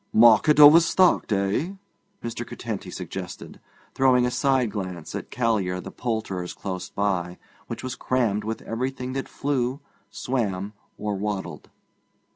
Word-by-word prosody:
'Market 120 Hz, +7 st, +6 dB
overstocked, 165 Hz, +2 st, +6 dB
eh?' 100 Hz, -, 0 dB, 0.5 s
Mr. 115 Hz, 0 st, -4 dB
Curtenty 110 Hz, -5 st, -6 dB
suggested, 90 Hz, 0 st, -7 dB, 0.3 s
throwing 130 Hz, -2 st, +4 dB
a 125 Hz, -, 0 dB
side 130 Hz, -3 st, +1 dB
glance 95 Hz, -5 st, -5 dB
at -, -, -5 dB
Callear 105 Hz, -7 st, 0 dB
the -, -, -8 dB
poulterer's 110 Hz, -7 st, -3 dB
close 95 Hz, -2 st, -5 dB
by, 90 Hz, -3 st, -1 dB, 0.3 s
which -, -, -6 dB
was 130 Hz, 0 st, -3 dB
crammed 115 Hz, -5 st, 0 dB
with 110 Hz, +1 st, -4 dB
everything 130 Hz, +2 st, -3 dB
that 135 Hz, 0 st, -4 dB
flew, 135 Hz, -2 st, -1 dB, 0.3 s
swam, 105 Hz, -6 st, -2 dB, 0.2 s
or 105 Hz, 0 st, -2 dB
waddled. 95 Hz, -6 st, -4 dB
110 Hz, 125 wpm, -25 LUFS, 95-130 Hz, 0.5 s, Market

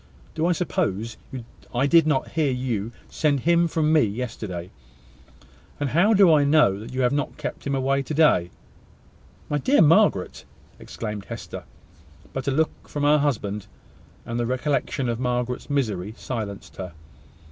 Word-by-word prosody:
Do 160 Hz, -, -5 dB
you 175 Hz, -, +3 dB
suppose 115 Hz, -, -2 dB, 0.6 s
I 130 Hz, +3 st, +2 dB
did 165 Hz, +2 st, +5 dB
not 145 Hz, -4 st, +1 dB
hear 155 Hz, -3 st, +1 dB
you 120 Hz, -4 st, -2 dB, 0.2 s
send 145 Hz, -4 st, 0 dB
him 170 Hz, +2 st, +3 dB
from 155 Hz, -1 st, +1 dB
me 155 Hz, -, +6 dB
yesterday? 105 Hz, -5 st, -4 dB, 1.1 s
And 145 Hz, -2 st, -1 dB
how 200 Hz, +8 st, +4 dB
do 190 Hz, -4 st, +6 dB
I 150 Hz, -2 st, +5 dB
know 140 Hz, -10 st, +4 dB
that 110 Hz, -, -9 dB
you 130 Hz, +1 st, -2 dB
have 125 Hz, 0 st, +3 dB
not 145 Hz, -1 st, -2 dB
kept -, -, -5 dB
him 140 Hz, -, 0 dB
away 135 Hz, +1 st, +1 dB
to 135 Hz, -, -5 dB
day?" 145 Hz, -, +4 dB, 1.0 s
"My 150 Hz, -, -1 dB
dear 270 Hz, -, +3 dB
Margaret!" 165 Hz, -, +3 dB, 0.4 s
exclaimed 105 Hz, -2 st, -6 dB
Hester: -, -, -8 dB, 0.7 s
but 135 Hz, 0 st, -4 dB
a -, -, +2 dB
look 155 Hz, +4 st, -1 dB
from 145 Hz, -, -3 dB
her 150 Hz, +1 st, +5 dB
husband, 105 Hz, -8 st, -1 dB, 0.6 s
and 115 Hz, 0 st, -3 dB
the 120 Hz, -, 0 dB
recollection 135 Hz, 0 st, -1 dB
of 115 Hz, -1 st, -2 dB
Margaret's 125 Hz, 0 st, -2 dB
misery, 110 Hz, -8 st, -1 dB
silenced 105 Hz, -6 st, -6 dB
her. 90 Hz, -2 st, -6 dB
135 Hz, 160 wpm, -24 LUFS, 115-150 Hz, 1.1 s, me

